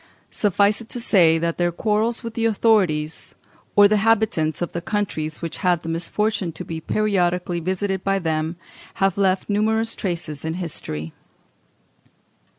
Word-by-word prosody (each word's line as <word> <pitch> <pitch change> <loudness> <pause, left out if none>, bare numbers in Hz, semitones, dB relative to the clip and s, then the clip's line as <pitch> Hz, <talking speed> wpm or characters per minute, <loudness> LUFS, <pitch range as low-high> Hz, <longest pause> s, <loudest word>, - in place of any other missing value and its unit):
Suffice 205 +1 +2
it 225 - -12
to 245 - -3
say 170 -8 +4
that 170 +1 -2
their 175 0 +2
quarrels 220 +6 0
with 230 -1 -5
the 230 0 -1
authorities, 190 -9 +1 0.4
or 205 0 +8
the 210 - +1
inhabitants 210 -8 +2
of 175 - -3
the 170 - -4
countries 170 -6 -3
which 165 - -4
had 180 -4 +1
the 165 - -5
misfortune 190 +3 -1
to - - -7
be 160 -1 -5
periodically 180 -3 0
visited 190 +2 -2
by 195 0 +1
them, 160 -2 -1 0.4
have 195 -3 +1
left 190 -1 +1
numerous 220 +2 +1
traces 170 -6 -4
in 160 +1 -2
history. 80 - -4
185 Hz, 155 wpm, -22 LUFS, 165-210 Hz, 0.4 s, or